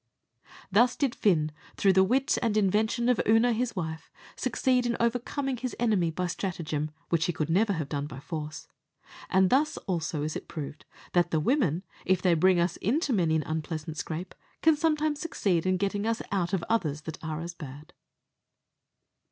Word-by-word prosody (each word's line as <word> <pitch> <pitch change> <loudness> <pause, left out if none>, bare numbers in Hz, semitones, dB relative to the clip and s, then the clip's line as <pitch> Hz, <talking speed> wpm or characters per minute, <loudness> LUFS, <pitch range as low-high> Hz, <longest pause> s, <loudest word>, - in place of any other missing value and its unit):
Thus 235 +5 +4
did 275 -4 0
Fin, 155 -7 +2 0.3
through 195 -1 +4
the 190 0 +6
wit 260 +7 +2
and 220 -2 +1
invention 215 +4 +2
of 250 -3 +3
Oonagh, 225 +2 +4
his 235 0 -1
wife, 160 -3 -4 0.3
succeed 250 -2 +1
in 235 - 0
overcoming 250 +3 -1
his 255 +1 -4
enemy 210 -8 +2
by 180 +3 -2
stratagem, 165 -4 -3 0.2
which 165 -1 +2
he 175 - -1
never 200 +5 +3
could - - -3
have 150 -3 -3
done 145 -1 -2
by 135 -3 -8
force: 155 0 -6 0.6
and 190 0 +4
thus 290 +4 +2
also 165 -5 -2
is 155 +1 -3
it - - -6
proved 150 -2 -7 0.3
that 175 -1 +3
the 160 - +1
women, 185 - +1 0.2
if 185 -1 +2
they 180 -1 +3
bring 180 +2 +4
us 170 0 +1
into 270 - 0
many 170 -6 +2
an 155 - +1
unpleasant 155 0 -4
scrape, 160 +5 -5 0.3
can 320 -1 +6
sometimes 305 -1 +1
succeed 185 - 0
in 185 0 +2
getting 200 +2 -1
us 230 0 -1
out 180 -3 0
of 190 -4 0
others 155 -10 0
that 160 +1 -8
are 155 -1 -3
as 170 +1 -5
bad. 150 +1 -10
185 Hz, 180 wpm, -28 LUFS, 160-230 Hz, 0.6 s, the